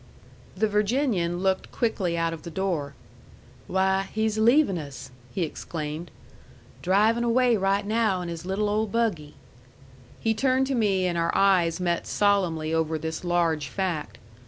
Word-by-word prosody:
The 220 +3 +2
Virginian 210 -5 0
looked 190 -1 0
quickly 195 -8 -1
out 165 0 0
of 165 - -8
the 170 - -8
door. 165 -6 -2 0.7
"Why, 190 +1 +1
he's 220 0 0
leavin' 235 - +4
us!" 135 -3 -9 0.2
he 185 - -1
exclaimed. 155 0 -5 0.7
"Drivin' 215 +6 +3
away 240 0 +3
right 200 0 +1
now 215 -3 +1
in 175 - -5
his 170 -1 -6
little 195 +3 -1
old 210 0 0
buggy!" 205 -11 -1 0.8
He 225 - +1
turned 260 +3 +2
to 270 - -2
me, 200 -6 +1
and 175 -1 0
our 165 - +1
eyes 180 -4 +3
met 175 -1 -1
solemnly 175 -6 +1
over 160 -1 0
this 160 +2 -5
large 170 -4 +1
fact. 180 0 -3
190 Hz, 150 wpm, -26 LUFS, 165-215 Hz, 0.8 s, leavin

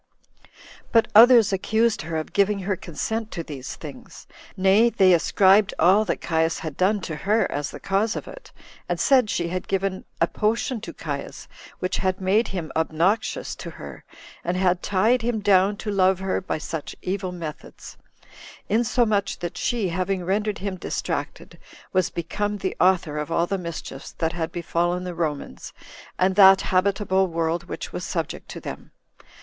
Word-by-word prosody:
But 225 -2 +4
others 230 -2 +7
accused 220 +4 +1
her 160 +1 -4
of 155 - -5
giving 200 +1 +2
her 195 +1 -1
consent 220 +7 -4
to 170 - -4
these 135 -5 -7
things; - - -11 0.3
nay, 195 +5 +5
they 190 -5 +4
ascribed 190 +4 +4
all 190 +6 +4
that 185 - -2
Caius 160 0 0
had 155 -3 -6
done 200 +4 +1
to 160 - -5
her 210 +5 +1
as 145 0 -2
the - - -9
cause 200 +3 0
of - - -6
it, - - -12 0.4
and - - -1
said 255 -5 +4
she 170 -3 -1
had 185 +1 -4
given 195 -1 -2
a 165 - +4
potion 220 +5 -1
to - - -7
Caius, - - -6 0.3
which 185 - -2
had 185 -1 -1
made 195 +5 +2
him 175 -5 -5
obnoxious 175 - 0
to - - -7
her, - - -10 0.4
and 175 +1 -1
had 185 -1 +2
tied 220 +6 +2
him 230 -1 -1
down 200 0 +3
to 210 - -4
love 190 -1 +3
her 190 0 -2
by 185 - -3
such 155 0 -6
evil 185 0 -2
methods; 165 -4 -8 0.7
insomuch 215 -2 +1
that 175 -1 -5
she, 225 -6 -1
having 185 +1 -2
rendered 205 +3 0
him 195 -1 -4
distracted, - - -4 0.3
was 185 0 +2
become 205 +5 -3
the 190 -1 -3
author 180 -5 +2
of 150 +2 -5
all 170 +1 +2
the 195 +2 -2
mischiefs 165 -5 -7
that 165 +1 -2
had 165 -1 -3
befallen 175 +1 -1
the 180 -1 -5
Romans, 155 -4 -4 0.4
and 185 +1 +2
that 195 -1 +8
habitable 190 0 +2
world 165 0 -1
which - - -7
was - - -4
subject - - -4
to - - -7
them. - - -8
190 Hz, 170 wpm, -24 LUFS, 170-205 Hz, 0.7 s, that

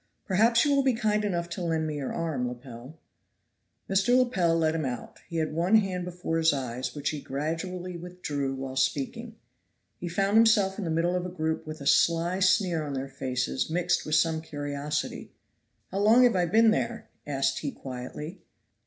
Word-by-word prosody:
Perhaps 225 +6 +4
you 285 -1 +3
will 280 - +4
be 265 -3 +2
kind 215 -2 +1
enough 175 -4 -1
to 170 +2 -5
lend 165 -2 0
me 155 -1 -3
your 140 -2 -3
arm, 155 -7 -2
Lepel." 125 +3 -9 0.9
Mr. 195 +6 +3
Lepel 190 -10 +2
led 160 -1 +2
him 160 -1 -1
out; 125 -3 -5
he 170 - -4
had 155 -1 -1
one 175 +6 +2
hand 190 -4 +1
before 175 -2 -2
his 160 -1 +4
eyes, 125 -2 -4
which 145 -1 -1
he 150 -2 -5
gradually 170 +6 -4
withdrew 150 -6 -4
while 135 0 -6
speaking. 145 - -1 0.6
He 175 - -4
found 195 +4 +2
himself 215 -3 +4
in 200 - -3
the - - -2
middle 165 +2 +1
of 180 - -1
a - - -6
group 160 -2 -3
with 155 -1 -7
a - - -7
sly 170 +5 +3
sneer 185 -3 +2
on 145 -2 -4
their 135 +1 -4
faces 130 - -2
mixed 175 +2 +1
with 155 - 0
some 160 0 +2
curiosity. 145 -1 -4 0.6
"How 195 - -2
long 220 +5 +6
have 245 -4 +4
I 175 -1 +2
been 225 +5 +5
there?" 230 0 -2 0.2
asked 135 -2 0
he 145 - -3
quietly. 135 +8 -7
165 Hz, 190 wpm, -27 LUFS, 145-190 Hz, 0.9 s, long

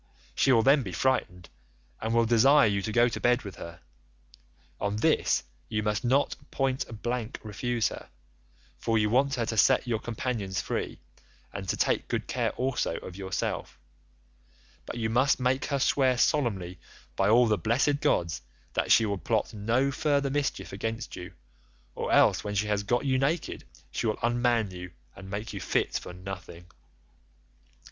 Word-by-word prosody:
She 135 - +3
will 115 -3 +5
then 140 +3 +5
be 95 -7 -6
frightened, 90 -5 0 0.5
and 110 - -2
will 115 0 +3
desire 135 +6 +5
you 100 -2 +1
to 110 - -3
go 120 +2 +4
to 120 - -3
bed 125 +1 +2
with 100 -3 -8
her; 85 0 -9 1.0
on 100 0 -1
this 105 -10 +2 0.3
you 105 -1 -1
must 105 -1 -1
not 130 +4 +2
point 130 -5 -2
blank 120 0 -3
refuse 115 +2 -1
her, - - -10 0.7
for 115 -1 +1
you 105 -1 +2
want 135 +3 +3
her 120 -3 -1
to 110 - -3
set 130 +5 +4
your 115 -3 -1
companions 110 -5 -3
free, - - -3 0.5
and 95 -2 -6
to - - 0
take - - +1
good - - -2
care - - -1
also 130 -9 -1
of 90 - -9
yourself, 95 -1 -3 1.1
but - - -5
you 110 -2 -1
must 130 +6 +2
make 130 +1 +1
her 140 - -1
swear 130 -1 +2
solemnly 105 - 0 0.4
by 95 +1 +2
all 120 +3 +6
the 110 -2 +3
blessed 135 - +1
gods 85 -9 0 0.3
that - - 0
she 115 - +6
will 100 -2 -2
plot 110 +2 -1
no 115 +6 +1
further 140 0 +1
mischief 135 - -2
against 115 +4 -4
you, 90 0 -8 0.6
or - - -3
else - - +4
when 105 0 -4
she 105 +1 +1
has 105 -1 0
got 120 +6 0
you 130 -1 +2
naked 150 +6 -1 0.3
she - - -2
will 110 - 0
unman 120 -3 +1
you 90 0 -8 0.3
and 95 0 -10
make 105 +2 -5
you 100 - -5
fit - - 0
for - - -4
nothing. 90 -1 -8
115 Hz, 170 wpm, -28 LUFS, 100-130 Hz, 1.1 s, all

